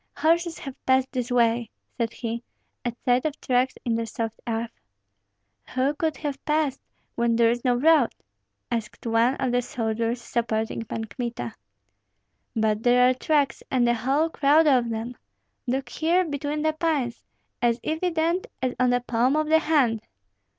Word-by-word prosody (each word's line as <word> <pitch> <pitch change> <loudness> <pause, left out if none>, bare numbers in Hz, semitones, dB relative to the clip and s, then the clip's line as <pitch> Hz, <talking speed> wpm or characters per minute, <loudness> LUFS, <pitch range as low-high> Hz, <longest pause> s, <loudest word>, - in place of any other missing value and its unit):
"Horses 330 +2 +2
have 270 -2 -9
passed 260 0 +3
this 250 -2 -2
way," 235 -2 +2 0.3
said 230 -2 -1
he, 235 0 -4 0.4
at 240 -1 -3
sight 250 0 +3
of 305 -2 -3
tracks 255 +1 +1
in 235 - +1
the 230 0 -1
soft 225 0 -4
earth. 230 0 -2 1.0
"Who 265 +3 +2
could 315 0 -1
have 285 -3 -4
passed, 300 -3 0 0.3
when 235 0 +1
there 230 0 +4
is 240 0 -3
no 250 -2 +3
road?" 295 0 +5 0.6
asked 230 -1 -4
one 230 +3 +3
of 260 -3 -1
the 245 0 +2
soldiers 230 0 -2
supporting 225 -1 -2
Pan 225 +1 -4
Kmita. 235 - -5 1.0
"But 215 -1 +1
there 250 +1 +5
are - - +1
tracks, 285 +2 +1
and 245 -2 +2
a 240 - +4
whole 275 +8 +1
crowd 300 +2 +4
of 255 -5 +3
them! 230 +2 -4 0.5
Look 265 +2 -1
here 345 +3 +2
between 290 0 -3
the 315 0 +2
pines, 305 -7 -1 0.4
as 240 0 +2
evident 330 +2 0
as 255 -1 -1
on 255 0 +4
the 245 0 +2
palm 245 +3 +1
of 310 0 0
the 320 0 +6
hand!" 275 -9 +2
250 Hz, 165 wpm, -25 LUFS, 235-295 Hz, 1.0 s, the